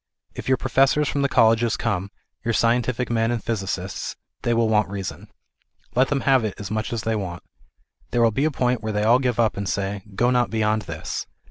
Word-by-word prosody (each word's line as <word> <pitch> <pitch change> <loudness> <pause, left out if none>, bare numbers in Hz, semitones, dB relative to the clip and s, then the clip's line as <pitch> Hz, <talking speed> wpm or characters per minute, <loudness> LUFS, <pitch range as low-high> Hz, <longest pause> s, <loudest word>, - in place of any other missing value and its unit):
If - - -7
your 130 0 +3
professors 135 +4 +2
from 140 - -1
the 140 - +2
colleges 115 -1 +3
come, 100 -4 -1 0.3
your 115 -1 0
scientific 120 +1 +1
men 115 -1 +2
and 120 -2 -2
physicists, 100 -5 -3 0.3
they 120 - 0
will 115 -1 +3
want 110 -2 +2
reason. 100 -2 -6 0.7
Let 130 +2 +3
them 145 -2 0
have 135 -3 +3
it 105 -3 -2
as 100 -1 -6
much 110 0 -2
as 115 -3 -2
they 110 0 0
want. 90 -4 -4 0.7
There 120 +3 +2
will 115 - +4
be 135 +7 0
a - - +3
point 125 -4 0
where 110 -1 -3
they 105 0 0
will 110 - +2
all 125 - +6
give 125 -3 -1
up, 110 -4 +2
and 100 -1 -2
say, 100 0 -2
" 95 - -15
Go 120 +4 +3
not 125 -1 +2
beyond 110 -1 +1
this." 80 -1 -4
115 Hz, 225 wpm, -23 LUFS, 105-125 Hz, 0.7 s, all